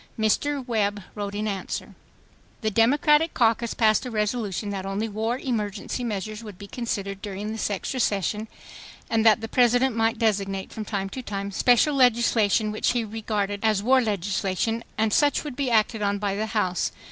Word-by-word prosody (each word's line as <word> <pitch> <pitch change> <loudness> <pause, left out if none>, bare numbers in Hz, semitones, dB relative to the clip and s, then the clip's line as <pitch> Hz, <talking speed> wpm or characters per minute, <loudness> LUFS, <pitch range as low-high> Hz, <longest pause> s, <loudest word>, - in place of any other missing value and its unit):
Mr. 260 +5 0
Webb 205 -3 0
wrote 205 -1 -5
in 210 +1 -2
answer: 195 -3 -4 0.7
"The 215 -1 0
Democratic 295 +8 +3
caucus 230 -1 +2
passed 220 0 +3
a 255 - -5
resolution 210 -2 -2
that 195 -1 -4
only 195 +3 -2
war 220 +3 -2
emergency 220 -2 -3
measures 215 0 -4
would 210 -4 -9
be 200 - -9
considered 200 -3 -4
during 205 +1 -5
this 220 -1 -2
extra 210 +6 -3
session, 210 0 0 0.6
and 225 -1 +2
that 220 0 +5
the 225 - -4
President 245 +1 +3
might 225 +1 +1
designate 195 -4 -1
from 220 -2 -5
time 195 -2 -2
to 260 - -6
time 200 -3 -4
special 245 +8 +3
legislation 235 -4 +3
which 215 +3 0
he 240 -2 0
regarded 210 -2 -2
as 215 -3 +2
war 260 +3 +5
legislation, 205 +1 -1
and 215 0 +1
such 290 -1 +3
would 295 -4 -6
be 275 -2 -1
acted 220 -1 +2
on 205 0 +1
by 200 -1 -1
the 215 +2 -2
House. 210 -5 0
215 Hz, 175 wpm, -25 LUFS, 205-235 Hz, 0.7 s, that